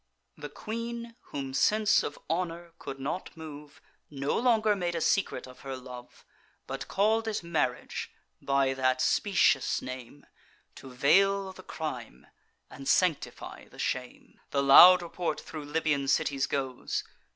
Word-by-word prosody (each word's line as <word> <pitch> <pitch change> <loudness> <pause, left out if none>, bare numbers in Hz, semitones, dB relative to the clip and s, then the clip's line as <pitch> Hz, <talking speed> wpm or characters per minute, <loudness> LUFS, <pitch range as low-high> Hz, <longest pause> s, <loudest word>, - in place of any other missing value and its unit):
The 150 -1 -8
queen, 230 +6 -6
whom 135 -2 -5
sense 210 +8 +3
of 145 - -5
honour 170 0 -3
could 135 - -7
not 155 +6 -5
move, 150 -2 -10 0.3
No 140 -1 -2
longer 220 -3 +3
made 175 -3 -2
a - - 0
secret 195 +3 0
of 130 0 -14
her 135 -1 -6
love, 125 -1 -11 0.4
But - - -6
call'd 220 +3 +1
it 215 -5 -2
marriage, 160 -7 -2 0.3
by 135 -1 +2
that 130 -1 +1
specious 190 -8 +2
name 130 +2 -9 0.5
To 135 - -11
veil 195 +9 +3
the 185 - -12
crime 125 - -6 0.4
and 135 0 -10
sanctify 180 -5 0
the - - -18
shame. 125 -1 -4
The 140 -1 0
loud 175 +6 +9
report 175 0 -3
thro' 155 - -8
Libyan 145 -1 -1
cities 140 0 +1
goes. 135 -3 -3
150 Hz, 140 wpm, -29 LUFS, 135-190 Hz, 0.5 s, loud